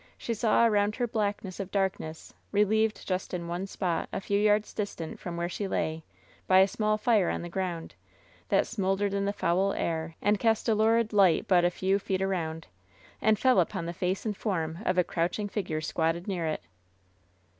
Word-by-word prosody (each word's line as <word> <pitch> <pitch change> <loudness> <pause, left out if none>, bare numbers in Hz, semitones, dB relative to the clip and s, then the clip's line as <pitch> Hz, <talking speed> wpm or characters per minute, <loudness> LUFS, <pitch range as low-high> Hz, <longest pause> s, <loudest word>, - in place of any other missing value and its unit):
She 235 - -3
saw 225 +1 +3
around 210 -1 +2
her 245 - 0
blackness 205 -4 -2
of 195 -2 -4
dark 195 -1 0
ness, 155 0 -9 0.2
relieved 215 +1 +2
just 185 -1 -2
in 170 -1 -4
one 175 +3 -3
spot, 180 -4 -2
a - - -2
few 200 +1 0
yards 210 0 +2
distant 185 -6 -5
from 175 -1 -6
where 170 0 -1
she 195 +3 -4
lay, 160 -3 -2 0.4
by 185 - +5
a 190 +1 +7
small 215 +1 0
fire 215 -4 +3
on - - -2
the 175 - -6
ground, 175 -2 -4 0.6
that - - +4
smol 195 -3 -1
dered 200 0 -1
in 200 0 0
the 200 - +1
foul 190 +1 +1
air, 160 -1 -2
and 205 0 +2
cast 225 0 +1
a 225 - +4
lurid 225 +1 +2
light 195 -5 +4
but 180 -3 +4
a 175 - +4
few 190 +2 0
feet 190 -1 -1
around, 165 -4 -2 0.6
and 215 -1 +4
fell 255 -2 +4
upon 175 0 0
the 170 - -4
face 180 +4 -2
and 210 -2 -1
form 165 -6 -2
of 185 - +1
a 180 - +5
crouching 175 +5 -1
figure 180 -7 -3
squatted 165 +3 -1
near 175 -5 -1
it. 155 - -3
195 Hz, 200 wpm, -28 LUFS, 170-210 Hz, 0.6 s, a